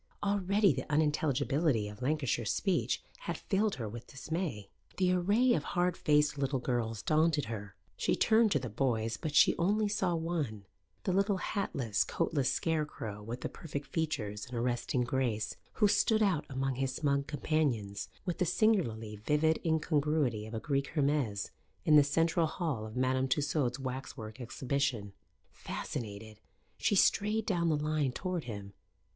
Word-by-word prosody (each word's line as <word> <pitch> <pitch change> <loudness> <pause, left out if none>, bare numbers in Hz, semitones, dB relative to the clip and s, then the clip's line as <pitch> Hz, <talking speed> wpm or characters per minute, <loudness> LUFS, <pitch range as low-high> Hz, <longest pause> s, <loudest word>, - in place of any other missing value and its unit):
Already 200 -2 +3
the 130 +3 -5
unintelligibility 145 -4 +1
of 105 +2 -10
Lancashire 135 -3 0
speech 180 - 0 0.3
had - - -1
filled 210 +1 0
her 115 -4 -4
with 120 +3 -8
dismay. 140 - -4 0.3
The 185 -1 +3
array 205 +8 +3
of 155 - +1
hard 175 +1 0
faced 150 -1 +2
little 135 0 0
girls 120 -4 -2
daunted 155 -2 +2
her; 100 -4 -6 0.2
she - - +1
turned 220 -1 +4
to - - +3
the 125 -2 -4
boys, 115 -1 0
but 155 -2 -4
she - - +6
only 205 +5 +2
saw 190 -4 0
one 155 - -2 0.4
the 185 - 0
little 200 +1 +2
hatless, 140 - -1
coatless 135 -5 0
scarecrow 150 -9 -2
with 115 +4 -6
the - - -2
perfect 145 -3 -6
features 105 -11 -2
And 120 0 -5
arresting 120 +1 0
grace, 120 -4 -1 0.2
who 210 - +4
stood 215 +2 +3
out 185 -8 +1
among 135 -1 -2
his 135 -1 -1
smug 140 -2 0
companions 130 -10 -1 0.2
with 180 -3 -2
the 180 - +3
singularly 115 - +1
vivid 150 +8 +2
incongruity 150 -8 +1
of 110 - -7
a - - -1
Greek 140 +2 -1
Hermes 140 -9 0 0.3
in 155 - +6
the 145 - +8
central 165 +3 +2
hall 150 -10 -3
of 110 - -8
Madame 130 +1 +2
Tussaud's 135 -2 0
waxwork 130 -3 -6
exhibition. 125 -4 -2 0.4
Fascinated, 110 -1 -6 0.4
she 205 - +2
strayed 210 +3 +3
down 170 -5 +1
the 155 - +2
line 150 -2 0
toward 180 +3 -3
him. 100 -4 -7
145 Hz, 155 wpm, -32 LUFS, 120-165 Hz, 0.4 s, the